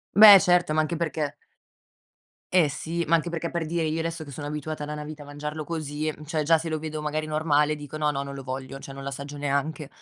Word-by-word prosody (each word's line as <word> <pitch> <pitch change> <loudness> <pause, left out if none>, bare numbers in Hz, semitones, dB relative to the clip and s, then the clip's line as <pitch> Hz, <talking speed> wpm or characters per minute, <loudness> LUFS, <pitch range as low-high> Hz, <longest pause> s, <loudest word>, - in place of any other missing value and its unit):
Beh, 205 -2 +11
certo, 180 -3 +3
ma 155 - +3
anche 155 +2 -1
perché 155 -3 -2 1.2
Eh 175 -5 +5
sì, 165 +4 -3
ma 165 - +3
anche 165 +1 +2
perché 170 0 -3
per 170 -2 -2
dire 165 +1 -1
io 160 +1 -1
adesso 165 -1 -3
che 145 - -10
sono 145 +2 -5
abituata 150 0 -4
da 150 +1 -5
una 150 - -5
vita 150 0 -8
a - - -10
mangiarlo 150 +2 -5
così, 155 -1 -3
mhmm, 150 - -12
cioè 155 0 -1
già 160 +2 +4
se 165 +1 -4
lo 155 -1 -2
vedo 155 0 -4
magari 150 +1 -2
normale 155 -1 +2
dico: 145 0 -8
"No, 150 -1 +1
no, 140 -1 -2
non 140 - -7
lo 135 - -7
voglio." 130 +1 -6
Cioè 135 - -9
non 135 0 -8
l'assaggio 140 +1 -6
neanche. 145 +1 -1
155 Hz, 245 wpm, -26 LUFS, 145-160 Hz, 1.2 s, Beh